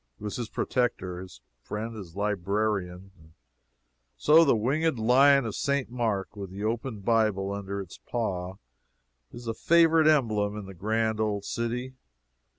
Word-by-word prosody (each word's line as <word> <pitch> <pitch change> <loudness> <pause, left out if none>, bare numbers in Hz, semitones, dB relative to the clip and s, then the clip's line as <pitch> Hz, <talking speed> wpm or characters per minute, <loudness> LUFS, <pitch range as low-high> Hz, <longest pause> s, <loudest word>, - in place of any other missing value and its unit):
It - - -13
was 105 - -4
his 120 -3 -4
protector, 95 -8 -1
his 90 -10 -12 0.2
friend, 110 - -5
his 95 -6 -9
librarian. 100 -2 -1
And 80 0 -20 0.8
so 160 +3 +6
the 140 - +4
Winged 140 +7 +1
Lion 135 +4 +5
of 110 - -3
St. 140 -1 -1
Mark, 110 -5 -2
with 100 -2 -6
the 100 +2 -7
open 115 0 -3
Bible 105 -3 +1
under 100 0 -5
his 95 -3 -9
paw, 95 -6 -3 0.8
is 120 0 -10
a 115 - -2
favorite 165 +4 +4
emblem 110 -9 +2
in 105 - -6
the 95 - -9
grand 110 +4 -1
old 105 -2 -1
city. 120 +2 -3
110 Hz, 155 wpm, -27 LUFS, 100-120 Hz, 0.8 s, so